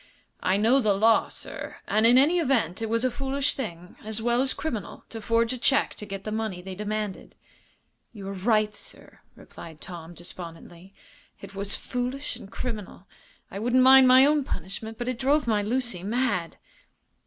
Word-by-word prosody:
"I 185 +1 +2
know 230 +6 +4
the 215 -5 +2
law, 220 +3 +4
sir, - - -7
and 215 +2 +3
in 245 +2 +6
any 310 +7 +5
event 235 - +1
it 225 - -2
was 230 +2 +1
a 255 - +1
foolish 275 +2 -1
thing, 180 -9 -7
as 220 +1 -4
well 240 +2 +1
as 265 0 +2
criminal, 235 - -5
to 225 - -7
forge 230 +2 +1
a 255 - -5
check 275 +4 +2
to 210 - -9
get 195 -1 -6
the 215 - -4
money 215 -4 -3
they 190 +1 -7
demanded." 210 0 -4 0.8
"You 200 -4 -9
are - - -4
right, 215 +2 +1
sir," - - -9 0.2
replied 160 -2 -12
Tom 175 -2 -9
Gates, - - -19
despondently. 175 +2 -11 0.4
"It 195 0 -11
was 200 0 -2
foolish 250 +4 -3
and 195 - -12
criminal. 215 -6 -6 0.5
I 195 - -5
wouldn't 245 +3 +3
mind 265 0 +8
my 260 +1 +8
own 295 0 +3
punishment, 215 +2 -6
but 240 - -4
it 250 -2 -2
drove 285 +3 +2
my 215 -3 +2
Lucy 240 -3 -2
mad." 205 -4 -1
220 Hz, 185 wpm, -26 LUFS, 195-255 Hz, 0.8 s, mind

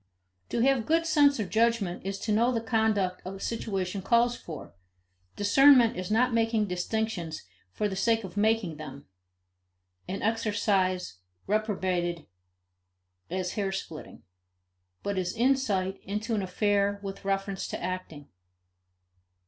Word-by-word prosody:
To 235 - 0
have 260 -3 +2
good 330 +1 +2
sense 290 -4 +4
or 215 - 0
judgment 220 -3 +1
is 195 +1 -3
to 220 - -2
know 230 +4 +3
the 235 - 0
conduct 220 -5 0
a 190 +1 -7
situation 195 -4 -3
calls 235 +4 +3
for; 155 - -9 0.6
discernment 245 +3 +6
is 185 0 -4
not 240 +3 +2
making 225 -1 +2
distinctions 180 -2 -3 0.3
for 210 - -1
the 195 - -4
sake 225 +3 +2
of 185 -1 -8
making 210 -6 +1
them, 140 -2 -9 1.0
an 195 - -4
exercise 205 - 0 0.3
reprobated 185 -5 -1 1.0
as 180 0 -2
hair 200 -2 -1
splitting, 165 -5 -7 0.8
but 200 -1 -1
is 180 +2 -2
insight 225 -7 +1
into 210 +4 -3
an 210 - +1
affair 200 +1 +1
with 195 0 -6
reference 195 0 -2
to - - -5
acting. 175 -5 -5
205 Hz, 130 wpm, -28 LUFS, 185-225 Hz, 1.0 s, discernment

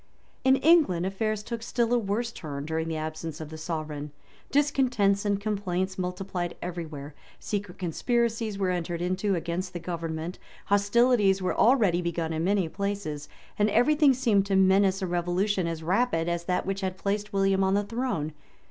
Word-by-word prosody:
In 265 0 +6
England 275 - +4
affairs 210 +2 -1
took 230 +1 -5
still 235 0 0
a 245 - +4
worse 225 +3 -2
turn 145 -7 -6
during 160 +1 -2
the 160 -1 -2
absence 155 +1 -5
of 155 -2 -7
the 160 - -8
sovereign. 155 -2 -4 0.4
Discontents 250 -9 +2
and 200 -1 +1
complaints 190 -3 -2
multiplied 180 -1 -3
every 175 -2 -5
where; 145 -1 -8 0.3
secret 205 -4 -4
conspiracies 225 +4 0
were 190 -2 +1
entered 175 -1 -2
into 185 +3 0
against 175 +2 -3
the 175 - -4
government; 165 0 -4 0.3
hostilities 205 0 +3
were 185 -1 -1
already 215 -8 +4
begun 170 -2 -2
in 160 +1 -1
many 195 -2 +2
places; 195 -6 -4 0.3
and 210 +1 +4
every 245 +8 +4
thing 295 -3 +5
seemed 220 -6 +2
to 195 - +1
menace 190 0 +4
a - - +1
revolution 180 +2 0
as 165 -1 -4
rapid 180 -2 +1
as 170 0 -2
that 180 0 0
which 195 0 -2
had 190 -1 -2
placed 205 +1 -2
William 195 -1 +2
on 190 +1 +2
the 205 - +2
throne. 205 - -2
190 Hz, 175 wpm, -27 LUFS, 170-210 Hz, 0.4 s, In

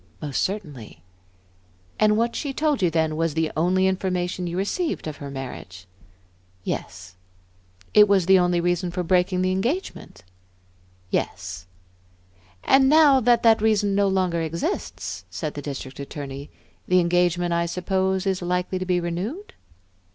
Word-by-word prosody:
"Most 145 -3 -2
certainly." 145 - -5 1.0
"And 210 0 +4
what 235 +1 0
she 280 -3 -3
told 295 -4 0
you 180 - +3
then 160 -1 0
was 165 -1 -1
the 160 -1 0
only 185 +4 +2
information 180 -1 -1
you 170 +1 -4
received 310 - -2
of 155 -2 -5
her 140 - -7
marriage?" 125 -9 -8 0.8
"Yes." 90 +1 -5 0.8
"It 210 0 +7
was 195 -3 +3
the 190 +1 +6
only 175 -1 +2
reason 175 +1 0
for 180 +1 -3
breaking 180 +1 +1
the 185 - +1
engagement?" 245 - -3 0.9
"Yes." 90 -1 -3 1.0
"And 265 0 +5
now 295 -3 +6
that 240 -1 +3
that 225 -2 +5
reason 210 -2 +2
no 200 0 +2
longer 185 -3 0
exists," 160 - -4
said 145 - -4
the 145 - -6
District 135 -2 -7
Attorney, 140 0 -7 0.4
"the 180 0 +4
engagement, 175 0 +1
I 170 0 0
suppose, 190 +2 -1
is 190 -1 0
likely 180 +1 -1
to 185 - -3
be 180 -1 +2
renewed?" 190 - -4
180 Hz, 145 wpm, -24 LUFS, 160-195 Hz, 1.0 s, It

